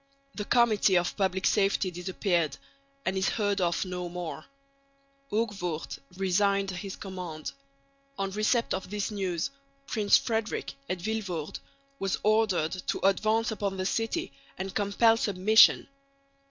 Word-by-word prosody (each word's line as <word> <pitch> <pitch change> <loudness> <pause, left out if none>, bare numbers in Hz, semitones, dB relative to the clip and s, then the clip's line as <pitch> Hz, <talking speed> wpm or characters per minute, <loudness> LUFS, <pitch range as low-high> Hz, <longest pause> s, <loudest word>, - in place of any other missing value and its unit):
The 210 - -4
Committee 215 -6 +4
of 175 0 0
Public 190 -1 0
Safety 195 -2 +2
disappeared 180 -2 -1 0.5
and 190 - 0
is 190 0 +1
heard 205 -3 0
of 175 +2 +1
no 180 -1 -4
more. 170 -3 -6 0.9
Hoogvoort 200 -7 -2 0.2
resigned 195 +1 +2
his 190 +1 -6
command. 180 -5 -6 0.7
On 195 0 -2
receipt 215 +4 +1
of 190 - -4
this 210 +1 -2
news 185 -3 -2 0.3
Prince 210 -5 +4
Frederick 225 -8 -2 0.2
at 185 - -1
Vilvoorde 190 -7 -3 0.4
was 195 -1 0
ordered 210 -7 +2 0.2
to - - 0
advance 220 +4 +2
upon 200 -3 -2
the 185 - -2
city 225 -7 -1 0.2
and 190 +1 -4
compel 215 +3 +3
submission. 210 +1 +5
195 Hz, 125 wpm, -28 LUFS, 180-215 Hz, 0.9 s, submission